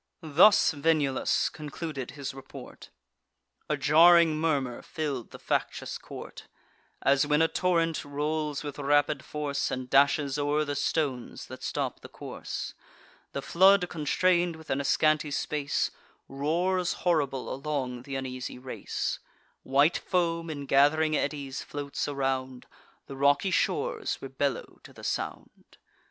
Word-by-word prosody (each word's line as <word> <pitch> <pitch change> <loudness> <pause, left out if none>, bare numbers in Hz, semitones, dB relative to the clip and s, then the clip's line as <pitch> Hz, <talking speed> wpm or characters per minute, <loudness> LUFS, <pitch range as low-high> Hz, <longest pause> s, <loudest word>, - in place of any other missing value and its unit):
Thus 165 +7 +6
Venulus 145 -3 +1
concluded 150 -3 -6
his 140 -1 -4
report. 135 0 -11 0.8
A - - +1
jarring 165 +1 +6
murmur 145 -6 -1
fill'd 145 -8 -4
the - - -10
factious - - -2
court: - - -10 0.6
As, 140 +1 +3
when 150 0 +3
a - - +4
torrent 165 -2 +1
rolls 150 +1 -2
with 145 -1 -6
rapid 145 +1 +2
force, 145 -2 -2
And 125 -1 -5
dashes 140 0 +3
o'er 145 +1 +1
the 145 - -2
stones 140 -3 -2
that - - -10
stop - - -3
the - - -12
course, - - -6 0.6
The 140 - -4
flood, 190 +2 +5
constrain'd 175 +2 +1
within 155 -4 -3
a - - -5
scanty 155 +1 +2
space, 145 0 -1 0.4
Roars 175 +6 0
horrible 145 -7 +1
along 130 -3 -3
th' 125 - -18
uneasy 130 -1 -5
race; 130 +1 -4 0.4
White 140 +5 +3
foam 170 -2 -1
in 145 -3 -5
gath'ring 150 +3 +4
eddies 140 -3 -2
floats 145 -1 -4
around; 130 -2 -2 0.4
The 135 - -8
rocky 140 +7 +3
shores - - 0
rebellow 135 +1 -3
to - - -15
the - - -14
sound. - - -5
145 Hz, 130 wpm, -28 LUFS, 135-160 Hz, 0.8 s, Thus